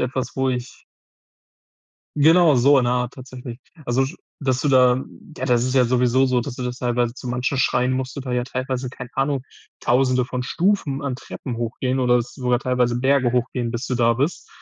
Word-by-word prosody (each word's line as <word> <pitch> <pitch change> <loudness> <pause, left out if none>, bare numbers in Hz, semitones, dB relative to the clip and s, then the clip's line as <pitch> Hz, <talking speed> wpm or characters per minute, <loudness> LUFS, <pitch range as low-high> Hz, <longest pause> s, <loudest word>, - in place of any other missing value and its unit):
etwas, 130 0 -2
wo 130 0 +1
ich 125 -1 -6 1.3
Genau 160 +1 +5
so 140 +4 +5
in 125 - 0
der 120 - +2
Art 125 0 -1
tatsächlich. 125 -2 -9 0.3
Also, 125 +2 +1
sch 135 - -7 0.2
dass 130 -3 0
du 150 - 0
da 130 -1 +4 0.3
ja, 130 - -4
das 120 -2 +2
ist 130 - -1
ja 130 -2 +5
sowieso 125 +2 +2
so, 125 -1 +1
dass 120 +1 -5
du - - -7
das 125 0 -4
teilweise 120 -1 -1
zu 130 - -8
manchen 125 +3 -1
Schreinen 125 0 +2
musst 130 0 -3
du - - -4
da 130 -2 -5
ja 125 0 0
teilweise, 130 0 -3
keine 125 -1 -9
Ahnung, 135 0 0 0.4
1.000e 125 0 +2
von 125 0 -4
Stufen 165 -3 0
an 140 -3 -2
Treppen 125 -1 -7
hochgehen 125 +3 -2
oder 125 -1 +3
sogar 125 0 -1
teilweise 125 -2 0
Berge 130 -2 +2
hochgehen, 125 -1 -1
bis 120 +2 -4
du 125 - -1
da 115 0 +3
bist. 140 +8 -2
125 Hz, 200 wpm, -22 LUFS, 125-135 Hz, 1.3 s, Genau